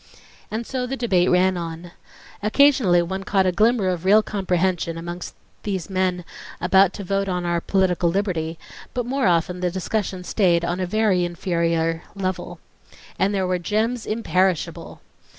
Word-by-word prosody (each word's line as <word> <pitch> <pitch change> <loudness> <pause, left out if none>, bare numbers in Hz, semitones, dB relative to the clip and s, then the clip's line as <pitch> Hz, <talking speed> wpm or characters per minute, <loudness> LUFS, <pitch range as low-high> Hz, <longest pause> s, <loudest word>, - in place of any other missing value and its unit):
And 225 +2 -4
so 255 0 -3
the 270 +2 -3
debate 190 -8 +2
ran 185 +1 +3
on. 170 0 -6 0.5
Occasionally 215 -6 +4
one 190 +3 -4
caught 195 -1 +2
a 185 - +3
glimmer 215 +1 +2
of 180 -2 -2
real 210 +3 +5
comprehension, 180 -4 -1
amongst 175 +1 -7 0.3
these 195 -3 -4
men 185 -2 0 0.3
about 190 0 +4
to 200 - -7
vote 195 +1 -1
upon 180 -2 -2
our 170 -1 0
political 180 -3 +1
liberty; 170 -4 -2 0.4
but 245 -1 -1
more 265 -2 0
often 175 +1 +1
the 180 0 0
discussion 190 +1 -3
stayed 175 -3 +2
on 175 +1 -2
a 185 - -1
very 205 -2 +2
inferior 170 -2 -1
level. 185 -2 -3 0.6
And 195 - +2
there 195 -2 0
were 180 0 0
gems 220 +6 -1
imperishable! 185 -6 -1
185 Hz, 155 wpm, -22 LUFS, 175-205 Hz, 0.6 s, real